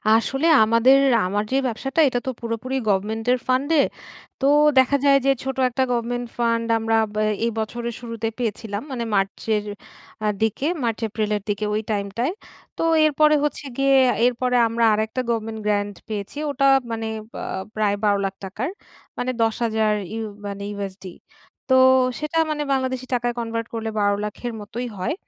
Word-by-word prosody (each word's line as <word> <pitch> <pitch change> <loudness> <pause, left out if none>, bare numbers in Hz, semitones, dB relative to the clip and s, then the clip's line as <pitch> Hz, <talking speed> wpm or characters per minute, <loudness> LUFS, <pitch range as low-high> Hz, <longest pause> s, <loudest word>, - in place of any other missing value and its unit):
আসলে 270 +7 +1 0.2
আমাদের 230 +5 +5 0.3
আমার 205 +3 0
যে 265 - +1
ব্যবসাটা 270 +6 -3
এটা 245 -2 0
তো 260 - +1
পুরোপুরি 235 +3 -3
গভমেন্ট 210 +3 0
এর 255 - +3
ফান্ড 260 +3 +1
এ। - - +7 0.6
তো - - +1 0.3
দেখা 270 +2 +4
যায় 275 0 +6
যে 275 - +5
ছোট 265 0 -4
একটা 260 +2 0
গভমেন্ট 245 +1 -2
ফান্ড 230 -1 +1
আমরা 225 0 +1 0.2
ব - - -14 0.3
এই 235 - 0
বছরের 235 +2 -3
শুরুতে 230 -2 -4
পেয়েছিলাম। 220 -2 -3
মানে 240 -2 -3
মার্চের 205 +2 0 0.6
আ - - +2
দিকে 225 +7 0 0.2
মার্চ-এপ্রিলের 215 -2 -1
দিকে 205 +1 -1
ওই 215 - 0
টাইমটায়। 210 - -1 0.4
তো - - -1 0.2
এরপরে 305 0 +4
হচ্ছে 295 0 -2
গিয়ে 275 0 +4 0.3
এরপরে 250 0 +1
আমরা 230 0 +1
আরেকটা 220 +4 -1
government 225 -1 -2
grant 205 -1 0
পেয়েছি। 210 +5 -5
ওটা 275 0 +2 0.2
মানে 225 0 -3 0.3
বা - - -6 0.3
প্রায় 210 -2 +1
৳১২,০০,০০০ 200 -2 +1
টাকার 215 - -4 0.5
মানে 255 +1 -1
১০,০০০ 220 -1 +1 0.2
ইউ 225 0 -3 0.2
মানে 200 0 -6
USD। 195 -1 -6 0.7
তো - - +7 0.4
সেটা 305 +2 -3
মানে 300 -1 -1
বাংলাদেশী 260 -1 -1
টাকায় 240 0 0
কনভার্ট 230 0 -3
করলে 225 -1 -3
৳১২,০০,০০০ 205 0 0
এর 235 - -4
মতোই 240 +4 -5
হয়। 185 - -1
230 Hz, 155 wpm, -22 LUFS, 210-255 Hz, 0.7 s, এ